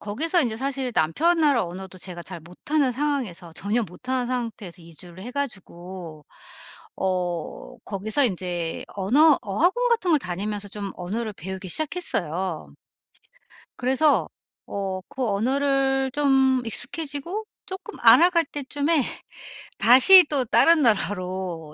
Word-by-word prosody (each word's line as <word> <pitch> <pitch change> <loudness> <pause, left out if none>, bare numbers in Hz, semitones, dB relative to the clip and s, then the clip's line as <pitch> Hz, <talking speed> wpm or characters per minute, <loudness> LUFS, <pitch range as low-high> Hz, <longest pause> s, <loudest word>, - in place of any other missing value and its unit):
거기서 315 - 0
이제 225 -4 -2
사실 265 -1 -3
남편 320 - +2
나라 280 -9 +3
언어도 185 +2 -9
제가 175 -1 -8
잘 170 - -8
못하는 255 - -1
상황에서 245 - -3
전혀 215 +4 -1
못하는 250 +7 -4
상태에서 225 -8 -5
이주를 170 +2 -12
해 245 - -6
가지고 180 - -7 0.7
어 180 -3 -3
거기서 215 +7 0
인제 175 -4 -3
언어 275 +10 +4
어학원 355 - +1
같은 445 -7 +1
걸 305 - +5
다니면서 205 +2 -4
좀 200 -1 -6
언어를 215 +5 -4
배우기 190 +2 -7
시작했어요. 180 - -2 1.0
그래서 260 - +2 0.4
어 195 -2 -4
그 260 - -4
언어를 270 +4 +1
좀 270 -2 +3
익숙해지고 290 - -2 0.2
쪼끔 390 +4 -8
알아갈 330 +9 +6
때쯤에 290 +2 -1 0.8
다시 265 +11 +8
또 275 -4 0
다른 330 +7 +4
나라로 185 -7 -1
230 Hz, 275 characters per minute, -24 LUFS, 185-285 Hz, 1.0 s, 다시